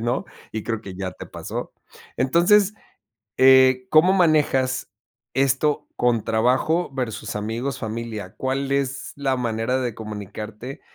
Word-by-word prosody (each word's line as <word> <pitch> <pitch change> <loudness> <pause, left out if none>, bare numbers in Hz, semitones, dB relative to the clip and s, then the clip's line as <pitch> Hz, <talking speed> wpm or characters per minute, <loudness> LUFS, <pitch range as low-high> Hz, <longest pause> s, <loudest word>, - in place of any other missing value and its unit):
¿no?, 120 +3 -1 0.3
y 110 -1 -3
creo 115 -2 -3
que 100 -4 -9
ya 95 0 -4
te - - -10
pasó. - - -6 0.4
Entonces, 185 +9 +4 0.6
eh, 130 -1 +6
¿cómo 160 +5 +6
manejas 150 -7 +2 0.4
esto, 135 +2 +1
con 120 -3 +1
trabajo 130 +10 +1
versus 125 -6 -4
amigos, 115 +6 -3
familia? 110 -3 -5
¿Cuál 135 +1 -2
es 135 -1 -1
la 135 -2 0
manera 115 +1 -1
de 125 -3 -2
comunicarte 110 +3 -7
130 Hz, 125 wpm, -23 LUFS, 110-140 Hz, 0.6 s, eh